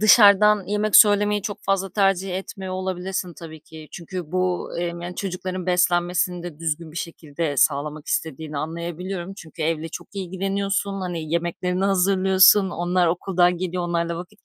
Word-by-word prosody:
dışarıdan 210 -2 +6
yemek 210 0 +2
söylemeyi 205 -1 +5
çok 205 -1 -4
fazla 195 -1 0
tercih 195 -2 +1
etmiyor 190 -1 -7
olabilirsin 185 -1 -3
tabii 160 -2 -10
ki. 155 0 -13
Çünkü 175 -1 -7
bu, 185 -1 -1
emm, 170 0 -3
yani, 175 +1 -6
çocukların 185 -1 -4
beslenmesini 180 0 +1
de 170 -4 -8
düzgün 160 -1 -3
bir - - -12
şekilde 160 -3 -4
sağlamak 150 +2 +1
istediğini 155 -1 -3
anlayabiliyorum 175 +4 -5
çünkü 165 -4 -9
evle 165 0 -1
çok - - -9
ilgileniyorsun, 195 +1 -2
hani, 170 -4 -4
yemeklerini 180 +2 -1
hazırlıyorsun, 190 0 +5
onlar 175 +1 +1
okuldan 180 +1 +2
geliyor 180 -1 -3
onlarla 170 -1 -1
vakit 180 +5 -11
180 Hz, 145 wpm, -23 LUFS, 170-195 Hz, -, dışarıdan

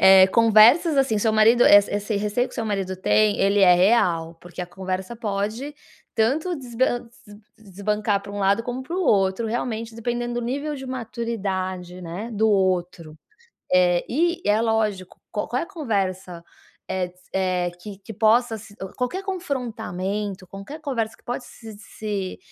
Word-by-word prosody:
eh, 190 0 +8
conversas, 230 - +5
assim, 265 -6 +2
seu 220 +1 +1
marido, 225 +3 +5
eh, - - +9
esse 205 +1 -2
receio 210 +5 0
que - - -14
seu 230 - -3
marido 195 -3 -2
tem, 210 +2 +2
ele 200 +1 +3
é 180 -2 +7
real, 175 -4 +2
porque 175 +1 -10
a - - -6
conversa 190 +3 -5
pode 220 +5 -3 0.4
tanto 285 +11 +1
desban 245 -2 -1 0.2
des 205 +1 -14 0.3
desbancar 210 +1 0
pra 200 - -9
um 205 - -5
lado 200 +3 +2
como 245 +2 -4
para 335 +7 -5
o 375 - 0
outro 195 - +2
realmente, 225 -1 -3
dependendo 240 +1 -3
do 240 - -2
nível 285 +4 -3
de 265 -1 -8
maturidade 195 -7 -4
né, 180 +7 -6
do 220 +1 +2
outro. 180 -5 0 0.5
Eh, 180 -1 +4
e 340 +6 +1
é 210 +1 +3
lógico, 215 -5 -1
qua 210 - -3
qual 250 - -1
é - - -2
a - - -17
conversa, 190 - -3 0.4
eh, 185 -1 -1
de 180 +1 -23
se, - - -27
eh, 185 -2 0
que 200 0 -9
que 205 +3 -10
possa 225 +2 +2
se 205 -1 -14
o 190 - -5
qualquer 250 +10 -2
confrontamento, 215 - -4
qualquer 200 - -9
conversa 235 -7 -3
que - - -29
pode 245 +1 -4
se 225 -2 -12
se 205 -2 -5
215 Hz, 175 wpm, -23 LUFS, 190-240 Hz, 0.5 s, eh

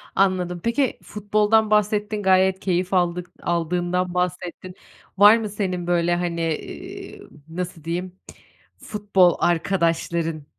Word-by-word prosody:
Anladım. 180 -3 +1
Peki, 240 +2 0
futboldan 210 +1 +1
bahsettin, 210 0 +1
gayet 190 0 +3
keyif 185 0 -1
aldık 180 -1 0
aldığından 175 +1 -1
bahsettin. 180 0 -3 0.4
Var 205 +3 +8
mı 215 -2 -4
senin 185 -4 -3
böyle, 175 0 +2
hani, 175 -1 -2
eee, 165 -2 -6 0.3
nasıl 175 -1 -6
diyeyim, 175 +3 -4 0.6
futbol 200 -4 +2
arkadaşların 165 -2 0
180 Hz, 110 wpm, -22 LUFS, 175-205 Hz, 0.6 s, Var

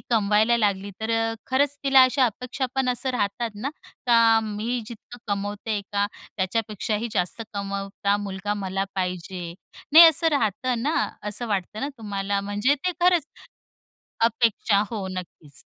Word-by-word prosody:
कमवायला 215 +2 +3
लागली, 200 -2 0
तर 220 +1 -2 0.2
अ, 225 - -4 0.2
खरंच 285 +2 +2
तिला 270 -1 +6
अशा 255 +1 +4
अपेक्षा 250 +4 -3
पण 265 -1 +1
असं 250 +1 -1
राहतात 230 0 -1
ना, 240 +8 -4 0.4
का 230 -1 +6
मी 220 +3 -3
जितकं 235 +1 -11
कमवते, 205 +1 -3
का 200 0 +2 0.3
त्याच्यापेक्षाही 215 +2 -2
जास्त 180 +5 -1
कमवाव 200 0 -3 0.2
का 200 0 +4
मुलगा 205 0 -3
मला 195 -1 -2
पाहिजे 180 -1 -3 0.5
नाही 330 +2 +11
असं 325 +1 +4
राहतं 240 -2 0
ना, 300 +5 0 0.3
असं 210 +4 -2
वाटतं 205 +1 -2
ना 275 - -2
तुम्हाला, 200 -2 -2
म्हणजे 205 +7 +1
ते 330 +6 -2
खरंच 350 -1 +4 1.0
अपेक्षा, 225 -3 +2
हो 210 -5 -4
नक्कीच. 170 -6 -9
215 Hz, 145 wpm, -24 LUFS, 200-245 Hz, 1.0 s, नाही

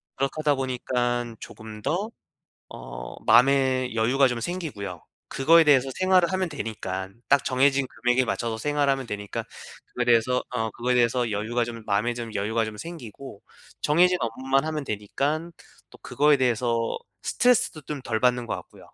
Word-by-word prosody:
그렇게 135 +1 0
하다 150 -2 +2
보니깐 120 -2 -2
조금 110 -1 -10
더 195 - -1 0.6
어 - - -9
마음의 130 -1 +4
여유가 125 +5 +3
좀 120 -1 -3
생기고요. 115 - -5 0.2
그거에 165 +5 +5
대해서 135 -3 +4
생활을 185 -1 +3
하면 185 -1 0
되니깐 100 -6 -5
딱 140 0 +4
정해진 135 +1 +3
금액에 125 +2 +1
맞춰서 110 +2 -2
생활하면 140 0 0
되니까 105 -2 -5 0.5
그래서 120 +1 +2
어 110 -3 -2
그거에 125 +3 -1
대해서 120 0 +2
여유가 115 +3 -1
좀 115 -1 -8
마음에 105 +4 0
좀 115 -2 -6
여유가 110 +2 0
좀 110 -1 -7
생기고 135 -7 -9 0.4
정해진 180 +4 +4
업무만 130 +5 0
하면 155 -2 -3
되니깐 140 +11 -2 0.4
또 - - -15
그거에 150 0 +3
대해서 120 -2 0 0.2
스트레스도 245 -10 +2
좀 145 0 -6
덜 110 -3 -2
받는 125 -1 +2
것 - - -2
같고요. - - -13
125 Hz, 350 characters per minute, -25 LUFS, 115-140 Hz, 0.6 s, 그거에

